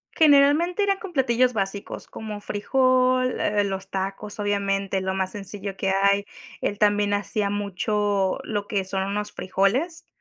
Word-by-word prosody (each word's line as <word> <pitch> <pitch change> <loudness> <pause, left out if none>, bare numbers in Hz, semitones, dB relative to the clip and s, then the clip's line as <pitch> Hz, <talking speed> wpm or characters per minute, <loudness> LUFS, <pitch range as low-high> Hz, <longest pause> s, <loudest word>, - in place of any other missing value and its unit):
Generalmente 310 +5 +5
eran 395 -1 +2
con 390 -4 -9
platillos 250 -3 +2
básicos, 200 0 -4
como 210 -2 -7
frijol, 255 +3 +2
eh, 205 0 +1
los 195 -1 -4
tacos, 195 +2 -4
obviamente 200 -1 0
lo 190 0 -1
más 190 0 -1
sencillo 195 -1 -6
que 195 - -1
hay. 200 +1 +3 0.4
Él 205 - -2
también 205 -1 +3
hacía 205 0 -1
mucho, 205 -1 0
lo 205 -2 -3
que 200 -2 -1
son 190 0 -2
unos 205 +1 -3
frijoles, 245 - 0
205 Hz, 145 wpm, -24 LUFS, 195-255 Hz, 0.4 s, Generalmente